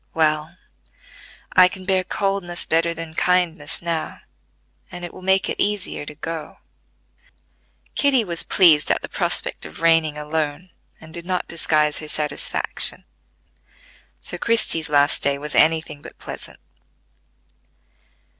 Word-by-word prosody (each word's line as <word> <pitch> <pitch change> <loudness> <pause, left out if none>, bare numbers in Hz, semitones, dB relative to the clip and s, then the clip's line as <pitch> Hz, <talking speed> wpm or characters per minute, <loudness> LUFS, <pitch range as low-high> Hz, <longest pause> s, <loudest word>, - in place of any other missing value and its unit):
"Well, 155 +1 +1 1.0
I 185 0 +8
can 185 0 -8
bear 190 -1 +2
coldness 195 -2 0
better 165 +1 +1
than 165 -1 -7
kindness 170 -4 0
now, 165 -2 -3 0.7
and 175 0 -7
it 175 - -9
will - - -12
make 190 +1 +2
it - - -2
easier 200 -7 -2
to 150 - -8
go." 160 0 -6 1.4
Kitty 275 -4 +3
was 170 -4 -4
pleased 160 -6 +5
at - - +1
the - - -4
prospect - - -2
of 75 - -9
reigning 165 -2 +3
alone, 150 +3 -3 0.3
and 160 0 -14
did 170 +1 -7
not 185 -1 -1
disguise 155 -2 +1
her 155 - -8
satisfaction; 150 -1 0 1.2
so - - -4
Christie's 165 -9 +2
last 145 0 +3
day 140 0 +2
was 150 +1 -6
any 160 0 +4
thing 150 -2 -11
but - - -12
pleasant. - - -7
165 Hz, 135 wpm, -22 LUFS, 150-180 Hz, 1.4 s, I